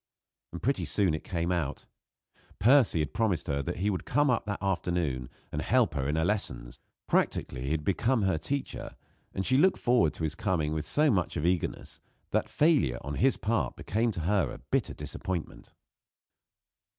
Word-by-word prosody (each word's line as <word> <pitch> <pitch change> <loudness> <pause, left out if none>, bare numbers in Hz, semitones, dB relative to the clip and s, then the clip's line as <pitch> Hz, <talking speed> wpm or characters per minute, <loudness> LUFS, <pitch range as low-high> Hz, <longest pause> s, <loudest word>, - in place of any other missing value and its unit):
And 85 - -8
pretty 140 +4 +1
soon 95 -6 +2
it 80 - -3
came 85 0 -2
out. 80 -6 -2 0.7
Percy 120 -2 +5
had 75 - -3
promised 110 -7 0
her 70 -1 -1
that 70 - -3
he 100 +3 +1
would 95 - -3
come 145 +1 +2
up 115 - 0
that 100 - -2
afternoon 85 -9 -1 0.2
and - - -2
help - - +2
her 70 0 -1
in 75 - 0
her 80 0 +1
lessons. 60 - -3 0.3
Practically 65 +1 0
he - - -2
had 75 0 -1
become 115 +4 +1
her 95 -5 +1
teacher, 140 - -4 0.4
and 95 - -1
she 130 +1 +3
looked 190 +5 +4
forward 120 -10 +2
to - - -6
his 80 -1 0
coming 85 -5 -1
with 80 0 -2
so 150 -1 +3
much 90 -6 0
of 75 - -1
eagerness 90 -1 -1 0.3
that - - 0
failure 145 - +3
on 70 - -5
his 135 - +2
part 115 +1 -1
became 115 +3 0
to 85 - -4
her 95 +4 +1
a - - -7
bitter - - -2
disappointment. 90 -4 -5
90 Hz, 185 wpm, -29 LUFS, 80-115 Hz, 0.7 s, Percy